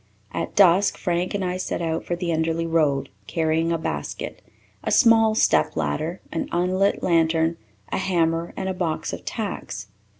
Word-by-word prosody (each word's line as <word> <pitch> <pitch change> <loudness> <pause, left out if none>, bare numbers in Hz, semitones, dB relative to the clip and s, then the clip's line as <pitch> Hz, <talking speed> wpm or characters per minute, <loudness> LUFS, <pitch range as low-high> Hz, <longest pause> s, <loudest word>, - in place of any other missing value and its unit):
At - - -3
dusk 195 0 +5
Frank 175 +2 -1
and 195 -2 -1
I 180 0 -1
set 185 - -3
out 165 -1 -2
for 175 - -1
the 175 0 -3
Enderly 165 +1 0
Road, 155 -4 +1 0.2
carrying 160 +1 +1
a 165 - +1
basket, 160 0 -5 0.4
a - - -1
small 225 -3 +5
step 75 - +3
ladder, 80 - -2
an 165 - -3
unlit 185 +3 +1
lantern, 165 -1 +2 0.3
a - - 0
hammer, 170 -3 0
and 190 - -2
a 190 - -1
box 170 -4 -2
of - - -6
tacks. 105 - -5
170 Hz, 165 wpm, -24 LUFS, 160-185 Hz, 0.4 s, dusk